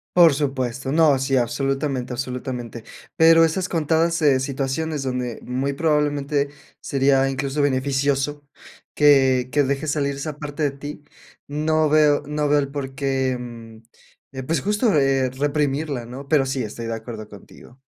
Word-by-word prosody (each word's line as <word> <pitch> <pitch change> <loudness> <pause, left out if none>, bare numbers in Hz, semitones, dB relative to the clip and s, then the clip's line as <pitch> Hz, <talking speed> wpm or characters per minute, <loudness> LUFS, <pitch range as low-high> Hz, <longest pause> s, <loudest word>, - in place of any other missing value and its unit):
Por 170 -4 +7
supuesto. 135 -2 -2
No, 155 -4 +4
sí, 135 0 0
absolutamente, 135 +1 -1
absolutamente. 125 -2 -5 0.3
Pero 165 0 +7
esas 180 +3 0
contadas, 165 +1 +1
eh, 140 -3 +4
situaciones 140 +3 -2
donde 125 -2 -3
muy 135 +3 -2
probablemente 145 -2 0 0.3
sería 135 0 +2
incluso 140 +2 -2
beneficioso 140 +1 0 0.5
que 135 -4 +4
que 145 -1 +3
dejes 140 +2 -1
salir 140 -2 -1
esa 145 +1 -5
parte 150 0 -4
de 145 - +2
ti, 145 +1 -9 0.5
no 155 +1 +1
veo 150 -1 +4
no 150 0 -1
veo 145 0 +3
el 140 - -2
por 135 -2 -5
qué, 135 -2 0
mm, 115 -2 -10 0.5
eh, 130 -1 -6
pues, 160 +1 -1
justo, 210 - +1
eh, 135 -2 +2
reprimirla, 145 -1 -1
¿no? 135 +4 -9
Pero 145 -4 +3
sí 135 -1 -2
estoy 115 +2 -6
de 115 - -3
acuerdo 110 -1 -8
contigo. 115 +5 -15
140 Hz, 150 wpm, -22 LUFS, 130-150 Hz, 0.5 s, Por